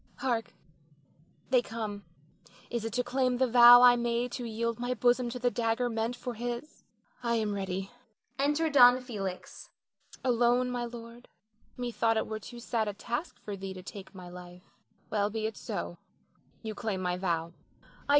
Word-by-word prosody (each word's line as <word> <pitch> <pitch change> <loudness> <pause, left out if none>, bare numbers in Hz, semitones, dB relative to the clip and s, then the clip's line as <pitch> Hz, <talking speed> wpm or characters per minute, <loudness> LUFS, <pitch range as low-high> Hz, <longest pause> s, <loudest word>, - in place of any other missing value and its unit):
Hark 240 -4 -2 1.0
they 250 -2 +5
come. 215 -4 -6 0.7
Is 235 -2 -2
it 225 - -4
to 250 +1 +1
claim 255 0 0
the 260 - +3
vow 245 0 +9
I 245 -1 +8
made 240 0 -1
to 245 -1 -5
yield 230 +1 -2
my 245 +1 -1
bosom 245 +1 +2
to 245 - -5
the 245 0 +1
dagger 235 +1 0
meant 225 +2 -1
for 245 0 -5
his? 240 +5 -6 0.4
I 235 -1 0
am 215 -2 0
ready. 195 -1 -3 0.5
[Enter 295 +4 +2
Don 250 -2 +8
Felix.] 200 -7 -6 0.5
Alone, 245 0 +2
my 245 -1 -2
lord; 235 0 -10 0.5
methought 230 -2 0
it - - 0
were 220 0 -5
too 240 +3 -10
sad 230 -2 -1
a 205 - -2
task 240 - -4
for 205 - -5
thee 190 0 -6
to 185 - -9
take 195 0 -10
my 180 -1 -9
life. 180 0 -11 0.5
Well, 205 -1 +1
be 220 0 -3
it 220 - -3
so; - - -5 0.6
you 220 -1 -4
claim 210 -2 -3
my 180 -1 -1
vow. 170 -2 -1
235 Hz, 170 wpm, -30 LUFS, 210-245 Hz, 1.0 s, vow